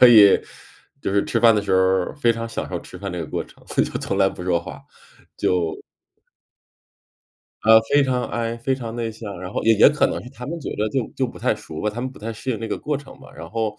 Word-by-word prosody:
可 125 - +11
以 105 -4 +8 0.6
就 - - -1
是 100 - +2
吃 115 - 0
饭 115 -2 +7
的 105 - +1
时 100 - -2
候 95 - +5
儿 95 -1 +2
非 120 - +4
常 115 0 -4
享 - - -4
受 - - -3
吃 90 - -11
饭 100 0 -5
这 90 - -4
个 80 - -4
过 - - -3
程， - - -20
就 - - +6 0.2
从 - - -2
来 - - +5
不 90 - -8
说 85 -2 +1
话， - - -9 0.6
就 85 -3 +1 1.9
呃， 110 0 +8
非 145 +5 +3
常 125 -2 0
I， 115 +1 -2
非 130 +3 0
常 120 -3 -6
内 115 -2 -2
向， 105 -4 -8
然 95 +2 -7
后 - - -2
也 115 0 +5
也 105 - +7
可 150 0 +1
能 - - -3
是 125 - -10
他 125 -3 -9
们 170 +3 -4
觉 - - -5
得 110 +1 0
就 120 0 -1
就 130 - 0
不 - - -11
太 - - +1
熟 80 0 -8
吧， 105 - 0
他 115 - -6
们 130 +1 -3
不 - - -14
太 115 +2 -5
适 115 +4 -5
应 115 - -1
那 115 - -4
个 105 - -2
过 150 -1 -2
程 140 -1 -12
吧， - - -14
然 80 - -9
后 110 -2 -2
115 Hz, 285 characters per minute, -22 LUFS, 100-120 Hz, 1.9 s, 可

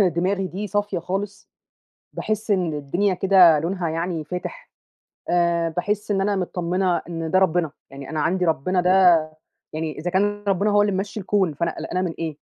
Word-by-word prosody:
دماغي 190 +1 +1
دي 190 +5 -5
صافية 205 -1 -1
خالص 195 +4 -5 0.7
باحس 215 0 -2
إن 180 -5 +1
الدنيا 175 +8 0
كده 180 -4 +5
لونها 175 +2 -2
يعني 165 0 -2
فاتح 180 - -7 0.6
آآ 170 -1 +2
باحس 205 +6 -2
إن 195 -1 +1
أنا 200 +1 +1
متطّمنة 180 0 -1
إن 165 -1 -4
ده 185 - +4
ربنا، 175 -4 +2 0.2
يعني 135 0 -9
أنا 155 -1 -2
عندي 180 +4 +1
ربنا 175 +3 +1
ده 180 +1 +1 0.8
يعني 155 0 -4
إذا 170 +4 -3
كان 205 +2 0
ربنا 200 +2 +2
هو 205 0 +4
اللي 205 -1 +1
ممشّي 195 +3 -3
الكون، 190 -3 +1
فأنا 170 +3 -2
قلقانة 185 - -2
من 180 -3 -2
إيه 160 -3 -4
180 Hz, 175 wpm, -23 LUFS, 165-195 Hz, 0.8 s, كده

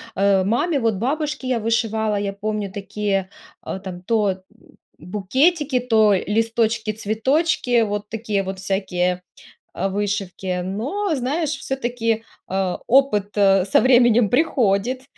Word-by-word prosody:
э, 195 -1 +3
маме 275 - +1
вот, 225 -3 +1
бабушке 290 +4 -2
я 250 -3 +1
вышивала, 220 -1 0
я 200 -1 -2
помню, 210 -1 -3
такие, 195 -1 -2 0.4
э, 190 - -4
там 180 -2 -7
то, 215 0 +1
м 185 - -6 0.2
м, - - -23 0.2
букетики, 260 - +1
то 220 -4 +3
листочки-цветочки 225 - 0
вот 205 0 -3
такие 215 -3 -2
вот 190 0 -5
всякие, 180 -2 -1 0.6
а, 195 - 0
вышивки. 195 -2 -2
Но, 295 - -2
знаешь, 285 +4 -1
всё-таки, 240 -5 -2 0.3
а, 190 -1 -1
опыт, 210 -6 +2
э, 195 -2 +4
со - - +4
временем 240 -4 +4
приходит, 250 -3 +1
215 Hz, 125 wpm, -21 LUFS, 195-250 Hz, 0.6 s, э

